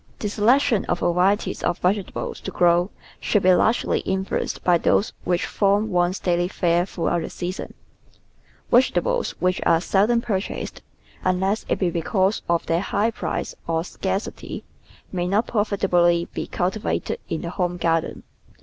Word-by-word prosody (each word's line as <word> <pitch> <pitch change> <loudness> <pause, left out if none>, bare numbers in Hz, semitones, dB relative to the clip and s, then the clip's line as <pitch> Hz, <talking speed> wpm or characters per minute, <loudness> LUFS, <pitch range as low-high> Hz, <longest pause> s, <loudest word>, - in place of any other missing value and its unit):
The 210 - -3
selection 230 +2 +3
of - - -1
varieties 180 +4 +1
of 175 - 0
vegetables 190 +1 -2
to - - -6
grow 175 +1 +3 0.3
should 210 - +1
be 185 0 +6
largely 225 +6 +2
influenced 190 0 -2
by 175 -2 +4
those 200 - +2
which 175 -1 +1
form 205 +2 +1
one's 175 +1 +1
daily 175 -1 +1
fare 175 -1 +1
throughout 175 -2 -1
the - - -5
season. 180 +2 -5 1.0
Vegetables 475 - +2
which 185 0 +1
are 165 - +4
seldom 205 +6 +2
purchased 210 -5 -3 0.2
— - - -27
unless 190 +3 0
it - - +1
be 180 -3 0
because 190 +4 0
of 170 -1 +1
their 165 +1 +1
high 215 +3 0
price - - -3
or 165 0 0
scarcity 190 +3 -4 0.2
— - - -27
may 180 -1 -1
not 205 +5 +2
profitably 180 -5 +2
be - - -4
cultivated 190 +4 -2
in 160 - -2
the 170 - -4
home 180 -2 -1
garden. 165 -1 0
185 Hz, 155 wpm, -23 LUFS, 175-205 Hz, 1.0 s, be